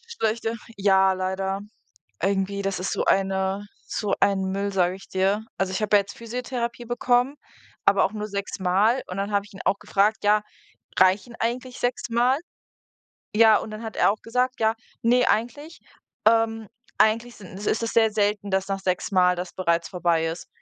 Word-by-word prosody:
schlechter. 225 - -2 0.2
Ja, 190 -1 +4
leider 190 +1 -2 0.6
irgendwie, 195 +1 0
das 195 -1 -2
ist 185 - -2
so - - -1
eine 195 +1 +1 0.2
so 210 - -1
ein 195 -1 +3
Müll, 200 +1 -2
sage 180 -1 +2
ich 195 - -13
dir. 195 +3 0
Also 190 -1 -1
ich 190 - -2
habe 210 0 +2
ja 205 - +8
jetzt 200 +1 -11
Physiotherapie 240 0 -4
bekommen, 245 +3 +1 0.5
aber 200 - +5
auch 205 - 0
nur 210 0 -4
sechsmal, 200 +3 0
und 185 - -6
dann 200 +1 -2
habe 200 0 +1
ich 205 - -17
ihn 190 - -8
auch 200 - +1
gefragt: 210 +2 +1
„Ja, 210 +1 +4 0.6
reichen 195 +6 +3
eigentlich 245 +2 -3
sechsmal?“ 245 +2 +1 1.0
Ja, 220 -1 +7
und 220 - -7
dann 215 +1 -7
hat 225 -2 -6
er - - +4
auch 215 - -10
gesagt, 250 +2 -1
ja: 220 0 +3 0.3
„Ne, 245 +2 +4
eigentlich, 290 +9 -2 0.5
ähm, 225 -1 +3 0.3
eigentlich 230 +2 +2
sind 190 -2 -11
ist 210 +2 -1
es 230 - -1
sehr 225 -1 +4
selten, 205 -1 0
dass 190 0 0
nach 195 0 -2
sechsmal 185 -1 +2
das 175 0 -5
bereits 170 -3 0
vorbei 170 -2 +1
ist.” 165 0 -5
205 Hz, 175 wpm, -24 LUFS, 190-230 Hz, 1.0 s, ja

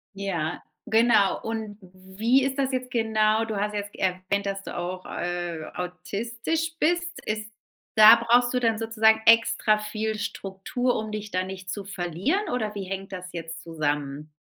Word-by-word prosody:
Ja, 175 -5 -3 0.2
genau. 220 -3 +3
Und 220 -2 -4
w 185 +1 -17
wie 255 +4 +4
ist 270 0 -1
das 270 -1 +1
jetzt 255 -1 -2
genau? 220 -2 +2
Du 220 -2 -4
hast 210 +1 -1
jetzt 205 0 -4
erwähnt, 185 +2 -1
dass 195 0 -3
du - - -7
auch, 180 +1 -4
äh, 175 -2 -3
autistisch 235 - -3
bist. 345 +2 +2 0.2
Ist 215 0 -3 0.4
da 220 +1 +10
brauchst 240 +2 +3
du 250 - +2
dann 225 -2 +1
sozusagen 220 -1 +3
extra 225 -1 +5
viel 215 0 -3
Struktur, 200 +6 -2
um 215 0 -5
dich 210 0 -5
da 185 0 0
nicht 185 -1 -8
zu 200 +1 -4
verlieren? 195 - -1
Oder 215 -4 -2
wie 200 - -3
hängt 195 +1 -6
das 185 -1 -7
jetzt 165 0 -6
zusammen? 150 -2 -3
210 Hz, 165 wpm, -26 LUFS, 185-225 Hz, 0.4 s, da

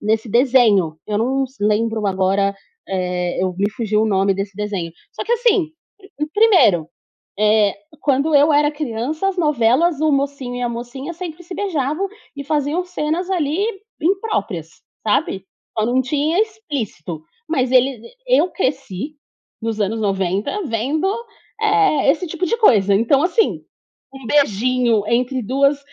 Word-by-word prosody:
nesse 220 +2 0
desenho. 225 - +3
Eu 210 -1 -1
não 265 +4 +1
s 265 +1 -12 0.2
lembro 220 0 0
agora, 195 +1 +1 0.3
eh 180 -2 -2 0.2
me 200 +2 +1
fugiu 215 -2 +1
o - - +1
nome 195 +1 +2
desse 195 0 -5
desenho. 200 -5 -3 0.2
Só - - -5
que 460 - 0
assim, 450 -8 +2 0.7
1º, 365 - +5 0.5
eh, 210 -2 +3 0.3
quando 285 +2 +1
eu 290 +2 +5
era 295 0 +4
criança, 295 +4 -2
as 385 - -3
novelas, 300 +1 +2
o 310 -1 +2
mocinho 275 -3 -2
e 245 - -4
a 245 - 0
mocinha 245 +6 -6
sempre 340 -1 -7
se 360 +2 -8
beijavam 340 -1 -1 0.3
e 280 - -4
faziam 300 +4 0
cenas, 350 0 -2
ali, 345 +2 0 0.3
impróprias, 330 - -1 0.4
sabe? 195 -2 0 0.3
Só 215 - +2
não 250 +2 +2
tinha 300 +7 0
explícito, 280 - -4 0.3
mas 260 -6 0
ele 260 +1 +5 0.3
eu - - +3
cresci 270 - -3 0.5
nos 225 -1 -2
anos 215 +2 0
90 195 -1 -1
vendo, 275 - -1 0.5
eh, 415 -10 +3
esse 330 +5 -1
tipo 345 +2 -3
de 465 - 0
coisa, 205 - +4
então, 235 +7 +3
assim, 370 +6 +1 0.5
um 270 -3 -10
beijinho 245 -3 +2
entre 250 +2 +1
2 275 +5 +2
260 Hz, 145 wpm, -19 LUFS, 210-315 Hz, 0.7 s, 1º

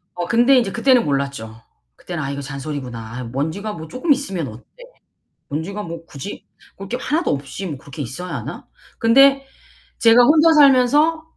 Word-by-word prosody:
어 175 - -3
근데 245 +3 +4
이제 200 -5 -2
그때는 245 - +3
몰랐죠. 140 -6 -3 0.3
그때는 170 -4 -6
'아, 135 - -3
이거 140 0 -5
잔소리구나. 135 -3 -6 0.2
아 125 - -5
먼지가 160 - -4
뭐 160 -1 -9
쪼끔 285 - +1
있으면 195 - -4
어때. 110 +3 -12 0.9
먼지가 185 +8 -4
뭐 165 -1 -8
굳이 145 +8 -9 0.3
볼 195 0 -8
게 245 - -2
하나도 315 +5 -1
없이 145 +7 -5
뭐 145 -5 -5
그렇게 145 +2 -9
있어야 160 +9 -6
하나?' - - -7 0.3
근데 275 +4 +5 0.5
제가 230 +1 +6
혼자 310 +4 +5
살면서 295 +3 +4
185 Hz, 345 characters per minute, -20 LUFS, -, 0.9 s, 제가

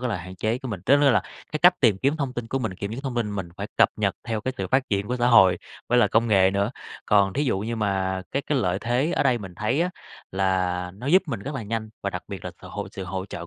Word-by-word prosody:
có 125 - -1
là 110 - -1
hạn 90 +2 -9
chế 110 +5 -1
của 130 - -7
mình. 100 -5 -4
Tức 140 - +6
tức 145 -1 +6
là 115 - +3 0.3
cái 155 - -1
cách 180 +3 +5
tìm 110 -7 +4
kiếm 140 +8 +1
thông 140 -4 -2
tin 120 -2 -5
của 135 - -1
mình, 110 -7 -3
kiểm 100 +2 -5
chứng 120 - -5
thông 135 -3 -4
tin 115 -3 -1
mình 95 -3 -4
phải - - -4
cập - - +6
nhật - - 0
theo 115 -2 -2
cái 130 +4 -2
sự - - -2
phát 130 0 +1
triển 100 -1 0
của 125 - -1
xã 120 0 +1
hội 95 -6 +6 0.3
với 125 - +4
lại 120 - +5
công 115 +1 +2
nghệ 95 -3 +5
nữa, 100 +2 0 0.4
còn 100 -2 +4
thí 145 - 0
dụ 125 - +1
như 115 +4 -3
mà 95 -3 -1
cái 140 - 0
cái 145 -1 0
lợi 95 -5 0
thế 125 +8 0
ở - - +2
đây 130 -3 +2
mình 95 -5 -9
thấy 110 - 0
á, 180 +1 +1 0.4
là 90 -2 0
nó 115 +7 -9
giúp 180 +7 +5
mình 120 -9 -3
rất 140 +8 -5
là 130 - -3
nhanh 110 +1 -4
và - - -1
đặc - - -5
biệt - - -7
là - - -4
sự - - -10
hỗ - - -5
sự 95 - -6
hỗ 95 +1 -4
trợ 90 - -7
hỗ 85 - -7
110 Hz, 310 wpm, -25 LUFS, 95-130 Hz, 0.4 s, Tức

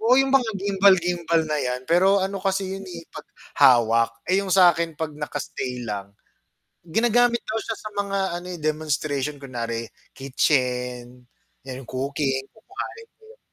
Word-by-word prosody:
'yong 260 +4 +4
mga 245 -4 0
gimbal-gimbal 180 -4 +3
na 150 - 0
'yan, 125 -1 -2
pero 190 +4 +4
ano 195 +1 -2
kasi 195 0 -1
'yon, 195 - -8
eh, 170 -2 -8
'pag 155 - -9 0.3
hawak, 115 -2 +5 0.2
eh, 190 +2 +3
'yong 200 - -5
sa'kin 170 -4 +4
'pag 155 -1 -3
naka-stay 130 -4 -5
lang. 100 -2 -5 0.7
Ginagamit 235 +7 +2
daw 220 - -2
siya 225 - -3
sa 215 - -7
mga 200 -1 -1 0.2
ano, 180 - -10
eh, 175 - -6
demonstration 150 -2 -1
kunwari 115 -4 -4 0.3
kitchen, 125 -2 -1 0.4
'yan, 130 -1 -6
'yong - - -15
cooking, 135 0 -1
kukuhanin 300 - -7 0.3
mo - - -26
'yon. - - -21
160 Hz, 150 wpm, -24 LUFS, 130-195 Hz, 0.7 s, hawak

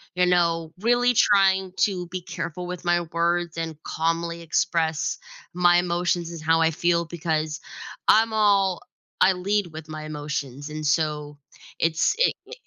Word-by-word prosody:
you 180 0 +3
know, 170 -2 +1
really 245 +2 +3
trying 190 -3 +4
to 180 -4 0
be 180 +1 -5
careful 175 0 -6
with 180 -1 -7
my 175 0 +2
words 170 0 0
and 160 -2 -5
calmly 170 +1 -2
express 160 -1 0 0.4
my 175 0 +4
emotions 175 -1 0
and 165 -2 -8
how 165 +1 +2
I 160 - +4
feel 170 +1 +1
because 160 -2 -2 0.5
I'm 225 +1 +5
all 200 -4 +3 0.4
I 190 - +6
lead 200 +2 -1
with 155 0 -8
my 155 0 -6
emotions, 145 -2 -5
and 155 0 -5
so, 150 -1 -1 0.4
it's 160 - +2
it - - +4 0.2
i - - -9
170 Hz, 150 wpm, -24 LUFS, 160-180 Hz, 0.5 s, I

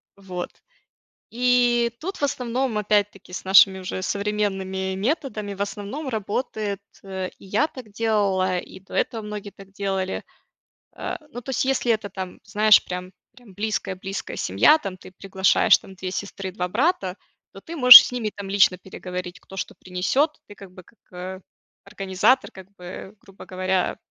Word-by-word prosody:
Вот. 185 -3 -6 0.8
И 240 -1 +3
тут, 380 +5 -5
в - - -7
основном, 250 -3 -1
опять-таки, 205 -3 0
с - - -5
нашими 190 0 +6
уже 185 0 -5
современными 195 -2 -2
методами, 215 - -2
в 195 - -6
основном, 210 +9 -6
работает, 215 -2 -3 0.2
э, 190 -1 -4
и - - -15
я 210 +10 +1
так 255 -7 -11
делала, 200 -4 +1
и 185 - -11
до 190 - -16
этого 225 -2 -1
многие 210 -1 -6
так 195 -1 -16
делали. 195 -1 -3 0.7
Э, - - -4 0.2
ну, 245 - -7
то 265 +3 -6
есть, 255 - 0
если 260 -3 +1
это 215 -2 -4
там, 185 -1 -7
знаешь, 215 0 +5
прям 180 0 -6 0.2
прям 245 -6 -18
близкая 210 -2 -2
близкая 195 +1 -6
семья, 305 - +4
там 195 -11 -6
ты 185 - -14
приглашаешь 190 0 +3
там 190 - -14
2 185 0 -5
сестры, 195 0 -5
2 180 -1 -3
брата, 210 - 0 0.4
то 195 - -12
ты 335 - -8
можешь 250 -3 +12
с - - -8
ними, 235 -4 -2
там, 200 -1 -7
лично 195 -2 +4
переговорить, 180 -1 -7
кто 195 - -14
что - - -4
принесёт. 190 - -1
Ты, 205 - -12
как 195 -2 -13
бы, 185 - -13
как, 230 - -25 0.2
э, 185 +1 -6 0.5
организатор 195 +7 +1
как 190 -1 -13
бы, 185 +2 -9
грубо 195 -1 -14
говоря, 185 0 -1
200 Hz, 165 wpm, -23 LUFS, 190-225 Hz, 0.8 s, можешь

